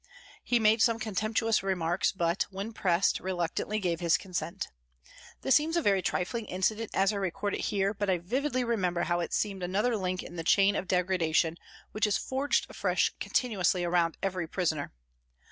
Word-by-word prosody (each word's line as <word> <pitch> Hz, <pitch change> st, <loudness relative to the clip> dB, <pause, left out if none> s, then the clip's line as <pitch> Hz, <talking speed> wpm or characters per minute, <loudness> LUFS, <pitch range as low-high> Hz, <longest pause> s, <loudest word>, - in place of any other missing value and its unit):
He 245 Hz, -, +2 dB
made 220 Hz, 0 st, +4 dB
some 230 Hz, -1 st, +4 dB
contemptuous 215 Hz, +1 st, 0 dB
remarks, 180 Hz, -1 st, 0 dB
but, 170 Hz, -1 st, 0 dB
when 200 Hz, +3 st, -6 dB
pressed, 185 Hz, -3 st, +2 dB
reluctantly 185 Hz, +3 st, -2 dB
gave 175 Hz, -5 st, -1 dB
his 170 Hz, -2 st, +3 dB
consent. 180 Hz, -3 st, -4 dB, 0.7 s
This 265 Hz, -, +2 dB
seems 315 Hz, +5 st, +3 dB
a -, -, +2 dB
very 195 Hz, -2 st, +3 dB
trifling 215 Hz, +5 st, -2 dB
incident 215 Hz, +4 st, -1 dB
as 195 Hz, +2 st, +3 dB
I -, -, -2 dB
record 200 Hz, +1 st, -2 dB
it -, -, -2 dB
here, 200 Hz, 0 st, 0 dB
but 205 Hz, -1 st, -2 dB
I 185 Hz, -, +3 dB
vividly 255 Hz, -, -1 dB
remember 185 Hz, -7 st, 0 dB
how 175 Hz, +1 st, 0 dB
it 170 Hz, -, -3 dB
seemed 200 Hz, -3 st, -1 dB
another 205 Hz, +7 st, 0 dB
link 185 Hz, -3 st, -2 dB
in 175 Hz, -, -10 dB
the 165 Hz, -, -3 dB
chain 195 Hz, +4 st, +4 dB
of 185 Hz, -, -2 dB
degradation 175 Hz, -3 st, +1 dB, 0.4 s
which 215 Hz, 0 st, +1 dB
is 210 Hz, -, +2 dB
forged 270 Hz, +2 st, 0 dB
afresh -, -, 0 dB
continuously 190 Hz, -7 st, +1 dB
around 170 Hz, -1 st, +1 dB
every 185 Hz, -4 st, -1 dB
prisoner. 160 Hz, -4 st, -1 dB
195 Hz, 175 wpm, -29 LUFS, 175-215 Hz, 0.7 s, made